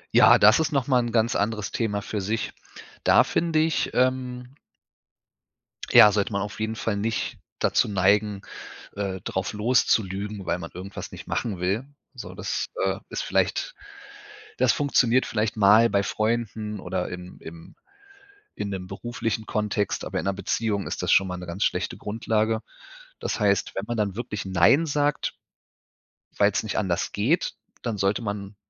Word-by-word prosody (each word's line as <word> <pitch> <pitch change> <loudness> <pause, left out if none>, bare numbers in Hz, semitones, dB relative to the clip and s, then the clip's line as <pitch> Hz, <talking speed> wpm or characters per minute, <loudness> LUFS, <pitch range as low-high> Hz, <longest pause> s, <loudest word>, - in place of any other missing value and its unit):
Ja, - - +8
das 105 +8 +6
ist 160 -1 0
nochmal 130 -2 +2
'n 120 -1 -3
ganz 115 0 +2
anderes 105 -1 -1
Thema 105 -3 -1
für 105 0 -3
sich. 110 +3 -2 0.5
Da - - +6
finde 165 -1 0
ich, 160 0 +1
ähm 125 0 0 1.4
ja, 105 - +9
sollte 100 +1 0
man 100 - -1
auf 105 +1 -6
jeden 110 +1 -2
Fall 110 -1 -2
nicht 110 +2 -2 0.2
dazu - - +2
neigen, 100 +1 +2 0.5
äh, 95 -2 -3
drauf 95 +2 -3
loszulügen, 105 -3 0
weil 90 - -1
man 85 - -8
irgendwas 95 +2 -8
nicht - - -10
machen 100 -7 -2
will. 100 +8 -1 0.3
So - - -8
ist, - - -3 0.2
äh - - 0
ist - - -3
vielleicht - - 0 0.8
das - - +4
funktioniert 130 -3 +2
vielleicht 110 0 -1
mal 110 +3 +6
bei 100 0 +1
Freunden 110 -1 -2
oder - - -3
im 90 0 -8
im 80 0 -11 0.8
in 100 - -4
'nem 95 -2 -5
beruflichen 115 +2 -4
Kontext, 105 -1 -1
aber - - -3
in - - -3
'ner 100 - +2
Beziehung 100 +1 -1
ist - - -4
das - - 0
schon 95 - +5
mal 90 - -4
'ne 90 - -8
ganz 85 +4 -2
schlechte - - -1
Grundlage. 110 +1 -1 0.6
Das - - -3
heißt, 100 -2 +1
wenn 95 - -3
man 120 -1 -3
dann 105 -3 -1
wirklich 105 -4 -4
nein 135 - +4
sagt, 145 0 0 1.0
weil's 100 0 +3
nicht 110 - -3
anders 90 -4 -1
geht, 125 - +1 0.3
dann 115 -4 -3
sollte 100 +4 +1
man 100 -1 -5
105 Hz, 160 wpm, -25 LUFS, 100-115 Hz, 1.4 s, ja